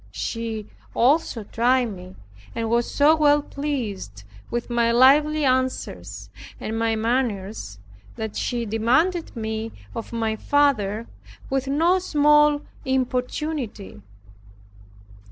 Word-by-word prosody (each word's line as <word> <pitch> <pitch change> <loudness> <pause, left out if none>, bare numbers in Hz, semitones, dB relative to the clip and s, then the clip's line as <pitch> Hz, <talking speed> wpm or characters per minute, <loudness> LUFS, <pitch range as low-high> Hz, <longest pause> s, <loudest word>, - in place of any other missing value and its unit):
She 225 -2 -4 0.3
also 255 -2 +2
tried 240 +3 +1
me 185 +1 -11 0.4
and 225 -1 -2
was 235 0 +1
so 295 +2 +4
well 295 -1 +4
pleased 220 - -4 0.3
with 240 -1 -3
my 235 -1 +2
lively 295 +5 +5
answers, 100 - -2 0.3
and 220 - -4
my 225 0 +1
manners, 220 - -2 0.4
that 220 -1 -5
she 240 -2 -2
demanded 260 - +1
me 220 0 -4 0.2
of 230 - -6
my 225 -2 -1
father 230 -5 +1 0.5
with 270 0 0
no 330 +7 +3
small 295 -3 +4 0.2
importunity. 255 - -2
240 Hz, 105 wpm, -23 LUFS, 220-285 Hz, 0.5 s, lively